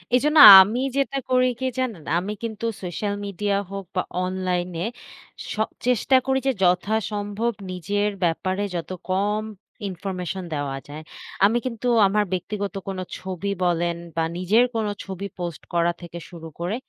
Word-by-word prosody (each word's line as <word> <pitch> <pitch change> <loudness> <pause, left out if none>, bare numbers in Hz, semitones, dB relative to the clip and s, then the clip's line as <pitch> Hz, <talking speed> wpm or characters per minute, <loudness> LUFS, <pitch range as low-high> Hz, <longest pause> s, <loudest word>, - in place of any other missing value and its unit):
এজন্য 300 +5 +2 0.2
আমি 210 +6 +1 0.2
যেটা 275 0 0
করি, 255 0 +4
কী 260 - -1
জানেন? 225 -11 -2
আমি 195 +4 -2
কিন্তু 230 0 -4 0.2
সোশ্যাল 195 +3 -3
মিডিয়া 200 +1 -1
হোক 195 -1 -5
বা 185 - +2 0.2
অনলাইনে 180 -1 -2 0.7
সব 220 0 0 0.2
চেষ্টা 250 +2 +3
করি 265 0 +2
যে, - - +4
যথাসম্ভব 205 +4 0 0.2
নিজের 205 +3 -1
ব্যাপারে 185 +4 0
যত 170 - -4 0.2
কম 205 +3 0 0.5
Information 185 0 -5
দেওয়া 140 -2 -3
যায়। 150 +2 -8 0.4
আমি 220 +4 +3
কিন্তু 250 -1 -3 0.2
আমার 210 +2 +2
ব্যক্তিগত 200 +2 -3
কোনো 190 -1 -3 0.2
ছবি 190 +1 -4
বলেন, 170 0 +1 0.2
বা 165 - +1
নিজের 205 +7 +3
কোনো 215 -2 0
ছবি 195 0 -6
পোস্ট 175 -3 -4
করা 170 0 +2
থেকে 170 0 -8
শুরু 165 -2 -9
করে, 175 +5 -2
195 Hz, 145 wpm, -23 LUFS, 175-215 Hz, 0.7 s, করি